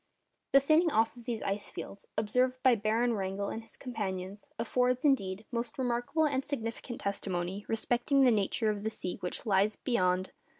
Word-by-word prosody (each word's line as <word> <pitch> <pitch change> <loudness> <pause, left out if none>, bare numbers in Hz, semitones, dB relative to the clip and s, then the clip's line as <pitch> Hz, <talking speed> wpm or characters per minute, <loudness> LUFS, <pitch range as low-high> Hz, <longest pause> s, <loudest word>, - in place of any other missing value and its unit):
The 275 - +9
thinning 310 +5 +4
off 225 0 +2
of 240 -1 -13
these 230 -2 -3
ice 200 +1 -2
fields, 200 - -8
observed 250 +4 +1
by 260 -2 +7
Baron 225 +2 +1
Wrangel 195 -1 -2
and 225 - -4
his 225 - -16
companions, 200 -5 -5
affords, 250 +3 +1
indeed, 210 -7 +2
most 235 -1 -3
remarkable 250 +5 +1
and 270 -3 +1
significant 235 -3 -4
testimony 190 0 -2
respecting 245 +5 +2
the 250 - +6
nature 215 +1 +1
of 205 -1 -4
the 220 - -1
sea 180 -4 -4
which 180 - -4
lies 205 0 +3
beyond. 185 -6 +1
225 Hz, 170 wpm, -31 LUFS, 200-250 Hz, -, The